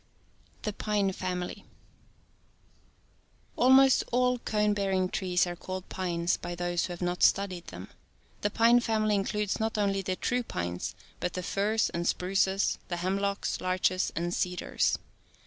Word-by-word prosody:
THE 210 - -2
PINE 205 -2 0
FAMILY. 180 -1 -4 1.9
Almost 265 +1 +6
all 250 0 +2
cone 210 -2 +1
bearing 190 -2 0
trees 180 -1 +1
are 175 0 -4
called 185 +1 -7
pines 175 -2 -1
by 175 0 -5
those 175 0 -1
who 180 - -5
have 175 - -6
not 175 0 -2
studied 185 -3 +2
them. - - -8 0.5
The 205 - +1
pine 230 +3 +5
family 215 -3 +1
includes 205 0 0
not 220 0 -1
only 200 -1 +1
the 185 0 -2
true 250 +6 0
pines, 85 - -4 0.2
but 180 - -2
the 180 - -4
firs 210 +5 +1
and 170 +1 -2
spruces, 190 +1 +1
the 175 - -3
hemlocks, 195 +3 -1
larches 185 0 +1
and 175 +1 -1
cedars. 180 -1 0
190 Hz, 145 wpm, -29 LUFS, 180-210 Hz, 1.9 s, Almost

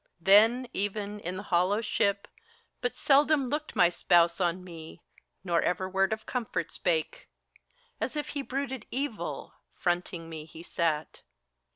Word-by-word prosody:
Then, 220 +8 +5
even, 205 +1 -3
in 185 -2 -4
the 205 - -6
hollow 185 +2 +2
ship, 200 -3 0 0.5
but 245 - -1
seldom 280 -1 +3
looked 300 +2 -3
My 175 - +6
spouse 175 0 +3
on 180 +1 0
me, 165 -3 -11 0.4
nor 170 -3 +1
ever 185 +1 0
word 195 +1 +1
of 220 0 -3
comfort 220 -9 -3
spake: 160 -3 -1 0.7
As - - -2
if 295 0 -3
he 285 - -3
brooded 265 -3 -4
evil, 265 -3 -4 0.2
fronting 175 -1 -2
me 160 -2 -7
he 160 +1 -12
sat. 160 -4 -2
195 Hz, 145 wpm, -29 LUFS, 175-245 Hz, 0.7 s, My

